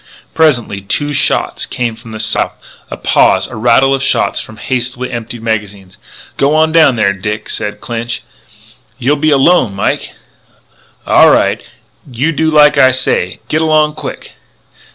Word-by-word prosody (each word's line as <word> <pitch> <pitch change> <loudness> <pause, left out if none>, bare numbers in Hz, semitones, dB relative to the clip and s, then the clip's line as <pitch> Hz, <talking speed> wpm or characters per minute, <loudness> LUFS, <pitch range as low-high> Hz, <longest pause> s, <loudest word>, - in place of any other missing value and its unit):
Presently 125 -11 +1
two 145 +9 -2
shots 140 - -1
came 120 -3 -3
from 115 0 -13
the 110 - -7
south. 110 0 -1 0.4
A - - -6
pause; - - +2
a - - -9
rattle 120 +4 +3
of 135 - -1
shots 135 - 0
from 110 - -9
hastily 125 +1 -3
emptied 120 -1 -6
magazines. 100 -4 -4 0.4
"G'wan 155 +3 +2
down 155 -5 +4
there, 105 -3 +1
Dick!" 105 +2 -5
said 105 -1 -5
Clinch. 115 -1 -4 0.7
"You'll 135 +5 +1
be 155 +2 0
alone, 135 - +3
Mike 100 - -2 0.5
" - - -35
"Au' - - +5
right. - - +1 0.5
You 135 +7 0
do 160 +1 0
like 150 -1 +5
I 130 - +6
say; 120 -8 -1
git 155 - 0
along 155 -1 +2
quick!" - - -8
125 Hz, 155 wpm, -13 LUFS, 110-150 Hz, 0.7 s, I